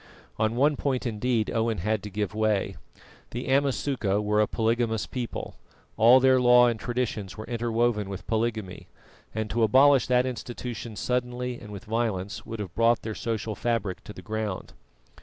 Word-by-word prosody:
On 110 +1 +1
one 145 +3 +3
point, 130 -3 -1
indeed, 115 0 0
Owen 115 -1 0
had 110 +5 -1
to 105 - -7
give 105 0 -3
way. 110 -2 0 0.5
The 120 +2 -5
Amasuka 135 -6 +1
were 105 0 +2
a 105 - +2
polygamous 115 -1 0
people; 125 -3 -5 0.4
all 120 +4 +7
their 130 0 +4
law 125 0 +7
and 120 -2 0
traditions 120 -6 -3
were 110 - -6
interwoven 115 -3 0
with 95 -1 -7
polygamy, 110 -4 -2 0.5
and 110 0 -1
to 115 - 0
abolish 130 +4 +5
that 125 0 +3
institution 120 -2 -5
suddenly 125 +1 -2
and 105 - -11
with 100 -2 -8
violence 105 -4 -2
would 115 -1 -6
have 95 -5 -5
brought 115 +1 +3
their 110 - -3
social 110 -1 -3
fabric 105 -4 -2
to - - -8
the - - -11
ground. 110 -3 -4
115 Hz, 165 wpm, -27 LUFS, 105-125 Hz, 0.5 s, all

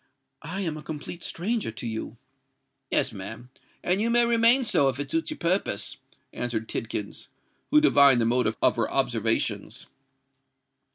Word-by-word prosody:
"I 180 +6 -5
am 165 -5 -3
a - - -8
complete 160 +3 -7
stranger 215 - -2
to 120 - -7
you——" 110 -1 -5 0.7
"Yes, - - +2
ma'am: 110 +6 -9 0.3
and 185 +3 +1
you 230 - +1
may 240 0 +4
remain 235 +2 +5
so, 140 - +3
if 130 0 -4
it 145 -1 -4
suits 165 0 -1
your - - -5
purpose," 180 +4 -1 0.4
answered 115 -2 -3
Tidkins, 105 -2 -5 0.4
who 300 - +6
divined 140 - +5
the 115 - +1
motive 115 -2 +1
of - - +3
her - - 0
observations. - - -1
150 Hz, 155 wpm, -26 LUFS, 120-205 Hz, 0.7 s, who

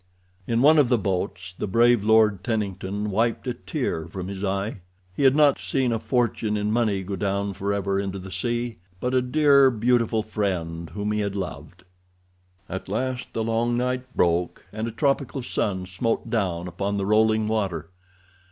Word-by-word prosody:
In 115 +1 +2
one 155 +2 +7
of 135 -5 +4
the 125 - +4
boats 95 -2 -3
the - - -3
brave 120 +1 +4
Lord 110 -3 +4
Tennington 105 -2 -2
wiped 115 +5 0
a 125 - -1
tear 85 -5 -3
from 95 +2 -6
his 100 0 -6
eye—he 95 -1 -4
had 135 0 +6
not 145 -2 +5
seen 130 -3 0
a 115 - 0
fortune 110 -2 0
in 105 0 -1
money 110 -4 +1
go 100 +2 -4
down 100 0 -1
forever 100 0 -1
into 100 -1 -3
the 95 0 -9
sea, 120 +5 -2 0.2
but 125 +4 -1
a 130 - +4
dear, 140 +1 +5
beautiful 115 -1 +1
friend 85 -6 -3
whom 105 0 -2
he 105 - 0
had 100 -1 -2
loved. 90 -2 -6 0.8
At 95 +1 -6
last 125 +4 -3
the 115 - -1
long 115 +1 0
night 125 +1 -1
broke, 85 0 +1
and 110 +2 -3
a - - -3
tropical 135 +2 0
sun 95 -5 -1
smote 115 +4 -2
down 90 -6 -1
upon 100 +4 -2
the 100 - -1
rolling 110 +1 +3
water. 95 -7 -2
105 Hz, 170 wpm, -24 LUFS, 95-120 Hz, 0.8 s, one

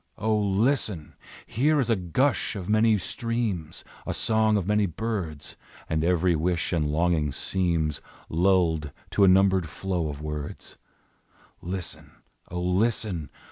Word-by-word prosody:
O, 110 0 +1
listen! 105 - +1 0.3
Here 150 +7 +2
is 120 -3 +1
a - - +4
gush 110 - 0
of 95 -3 -5
many 110 +1 +4
streams, 110 -5 -3 0.2
A - - -1
song 110 -1 +3
of 95 - -1
many 105 0 +2
birds, 85 -5 -4 0.3
And 80 0 0
every 90 0 +2
wish 85 +2 -1
and 80 -3 +1
longing 80 -1 +1
seems 85 -3 0 0.3
Lulled 85 -3 +2 0.2
to 100 - +3
a - - +7
numbered 95 -2 +4
flow 90 -1 -2
of 70 -1 -6
words, 75 -1 -6 0.8
Listen! 90 0 -5 0.4
O, 90 - -4
listen! 90 -2 0
90 Hz, 135 wpm, -26 LUFS, 80-105 Hz, 0.8 s, a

